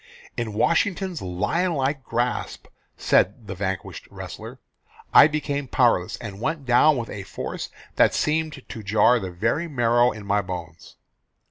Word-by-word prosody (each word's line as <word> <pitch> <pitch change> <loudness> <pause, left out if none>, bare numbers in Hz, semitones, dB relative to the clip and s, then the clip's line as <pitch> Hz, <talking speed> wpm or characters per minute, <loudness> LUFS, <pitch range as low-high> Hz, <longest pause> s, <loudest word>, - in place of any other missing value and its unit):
"In 115 -3 -3
Washington's 175 - 0
lion 105 - -1
like 135 0 -1
grasp," 120 +1 -2 0.3
said 105 +5 +2
the 100 - -5
vanquished 95 -1 -4
wrestler, - - -9 0.6
"I - - +9
became 145 -2 -3
powerless, 115 -8 +2
and 105 -3 -8
went 155 0 -2
down 130 +4 +5
with 115 -2 -4
a 100 - -6
force 95 0 -6 0.3
that - - +4
seemed 155 -2 -1
to 110 - -7
jar 110 +4 +4
the 95 -3 -5
very 115 - -1
marrow 120 -3 +3
in 105 -1 -9
my 100 +1 +2
bones." 85 -4 -8
120 Hz, 145 wpm, -24 LUFS, 100-145 Hz, 0.6 s, I